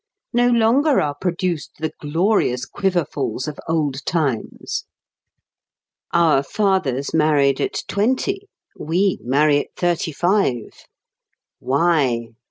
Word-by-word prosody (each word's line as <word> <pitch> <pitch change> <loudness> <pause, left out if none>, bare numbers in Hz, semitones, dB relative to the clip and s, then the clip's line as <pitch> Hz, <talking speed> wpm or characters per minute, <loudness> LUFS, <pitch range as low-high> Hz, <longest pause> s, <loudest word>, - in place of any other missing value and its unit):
No 240 +1 +3
longer 245 +5 +3
are 145 -1 0
produced 175 0 -3
the 155 0 -3
glorious 150 - +1
"quiverfuls" 175 -8 -2
of 150 - -6
old 150 -3 -1
times! 145 -9 -2 1.3
Our 160 -5 +4
fathers 140 - 0
married 145 -4 +3
at - - -2
twenty; 260 - 0 0.3
we 180 +5 0
marry 145 +4 +3
at - - -7
thirty 175 -2 0
five. 175 - +1 0.9
Why? 135 -5 +1
160 Hz, 100 wpm, -21 LUFS, 140-195 Hz, 1.3 s, Our